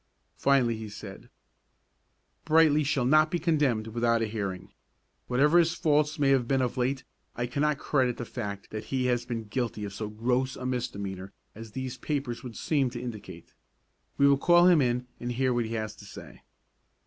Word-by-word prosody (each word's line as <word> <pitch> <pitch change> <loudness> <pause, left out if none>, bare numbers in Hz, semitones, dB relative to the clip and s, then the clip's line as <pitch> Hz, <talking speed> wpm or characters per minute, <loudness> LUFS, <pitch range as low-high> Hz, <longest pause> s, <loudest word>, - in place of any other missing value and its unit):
Finally 130 -5 +2
he 110 -1 -7
said, 100 - -10 1.1
"Brightly 155 -1 +4
shall 135 -3 0
not 155 +4 +5
be 175 - 0
condemned 145 -10 +1
without 115 0 +1
a - - +1
hearing. 100 -4 -5 0.6
Whatever 150 +7 +4
his 165 -1 +2
faults 150 -2 +1
may 140 -2 +2
have 130 -3 +2
been 135 0 +2
of 125 - -2
late, 130 +1 -1 0.3
I 120 - -2
cannot 145 +4 0
credit 130 -4 0
the 120 - -5
fact 100 -5 -6
that 110 0 -5
he 130 +2 -1
has 120 -1 0
been 115 -2 -3
guilty 110 -1 -3
of 100 - -7
so 105 +1 -5
gross 125 +4 -1
a 125 - -7
misdemeanor 100 -6 -4 0.2
as 110 0 -11
these 130 -1 -5
papers 140 -6 -3
would 120 -3 -9
seem 140 -5 +1
to 120 0 -7
indicate. 105 -8 -8 0.6
We 140 - +5
will 140 -1 +4
call 175 +3 +5
him 175 -4 +6
in 125 -1 0
and 120 0 -3
hear 130 +1 +1
what 120 -1 0
he 115 +1 -4
has 110 -1 -4
to 100 - -12
say." - - -12
125 Hz, 185 wpm, -28 LUFS, 110-140 Hz, 1.1 s, him